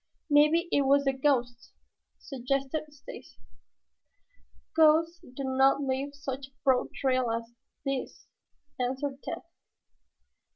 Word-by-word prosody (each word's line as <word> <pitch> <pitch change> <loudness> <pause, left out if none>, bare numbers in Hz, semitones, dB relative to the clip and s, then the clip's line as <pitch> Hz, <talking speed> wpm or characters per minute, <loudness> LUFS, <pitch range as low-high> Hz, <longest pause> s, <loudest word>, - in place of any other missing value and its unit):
"Maybe 300 +4 +5
it 285 - +3
was 280 +1 +4
the 270 -1 +1
ghost," 250 -3 0 0.4
suggested 275 +3 -3
Stacy. 290 - -12 1.4
"Ghosts 325 +2 +4
do 255 +2 -9
not 265 +1 +3
leave 275 +1 -2
such 275 -2 -5
a - - -29
broad 260 -2 +2
trail 255 -2 0
as 230 +1 -4 0.3
this," 275 -1 -4 0.5
answered 265 +2 -2
Tad. - - -6
275 Hz, 110 wpm, -29 LUFS, 260-290 Hz, 1.4 s, Maybe